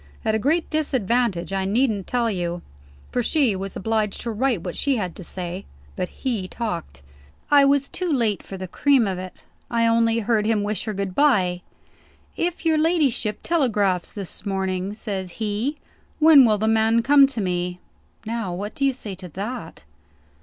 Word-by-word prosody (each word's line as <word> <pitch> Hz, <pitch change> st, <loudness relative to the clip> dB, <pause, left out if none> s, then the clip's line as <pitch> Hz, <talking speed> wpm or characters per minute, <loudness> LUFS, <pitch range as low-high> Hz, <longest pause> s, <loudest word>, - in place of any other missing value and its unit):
At 220 Hz, -, +2 dB
a 220 Hz, -, +1 dB
great 315 Hz, +8 st, +1 dB
disadvantage, 240 Hz, -, 0 dB
I 195 Hz, 0 st, 0 dB
needn't 215 Hz, -1 st, +1 dB
tell 235 Hz, -2 st, +1 dB
you; 175 Hz, -2 st, -3 dB, 0.5 s
for 245 Hz, -, 0 dB
she 255 Hz, -4 st, +2 dB
was 195 Hz, 0 st, -5 dB
obliged 215 Hz, 0 st, -1 dB
to 235 Hz, -, -3 dB
write 225 Hz, -4 st, 0 dB
what 175 Hz, -, -5 dB
she 280 Hz, -2 st, +1 dB
had 185 Hz, -7 st, -3 dB
to -, -, -8 dB
say. 180 Hz, +2 st, -5 dB, 0.3 s
But 180 Hz, -, -3 dB
he 230 Hz, -8 st, -3 dB
talked. 170 Hz, -, -5 dB, 0.5 s
I 285 Hz, -1 st, +7 dB
was 280 Hz, 0 st, +3 dB
too 360 Hz, +2 st, -3 dB
late 230 Hz, -8 st, +1 dB
for 195 Hz, -, -8 dB
the 185 Hz, 0 st, -6 dB
cream 270 Hz, +4 st, +3 dB
of 190 Hz, -2 st, -2 dB
it; 185 Hz, 0 st, -9 dB, 0.3 s
I 230 Hz, -1 st, +2 dB
only 230 Hz, 0 st, +3 dB
heard 220 Hz, -1 st, +1 dB
him 220 Hz, -2 st, +1 dB
wish 210 Hz, +2 st, -2 dB
her 215 Hz, -2 st, -3 dB
good 195 Hz, -1 st, -3 dB
bye. 185 Hz, -10 st, +3 dB, 0.7 s
'If 345 Hz, 0 st, -2 dB
your 320 Hz, -1 st, +3 dB
ladyship 290 Hz, -, +1 dB
telegraphs 210 Hz, -, +1 dB
this 200 Hz, -2 st, -8 dB
morning,' 190 Hz, 0 st, -2 dB
says 190 Hz, -5 st, -5 dB
he, 220 Hz, +7 st, -2 dB, 0.4 s
'when 305 Hz, -4 st, +8 dB
will 215 Hz, -2 st, +3 dB
the 220 Hz, +2 st, 0 dB
man 225 Hz, +1 st, +3 dB
come 280 Hz, +2 st, +6 dB
to 270 Hz, -4 st, -6 dB
me?' 180 Hz, -2 st, -2 dB, 0.5 s
Now 220 Hz, -5 st, -3 dB
what 205 Hz, +3 st, -5 dB
do 275 Hz, -, -4 dB
you 270 Hz, -, +3 dB
say 220 Hz, -6 st, -7 dB
to 185 Hz, -1 st, -9 dB
that?" 200 Hz, +2 st, -6 dB
220 Hz, 180 wpm, -23 LUFS, 190-255 Hz, 0.7 s, when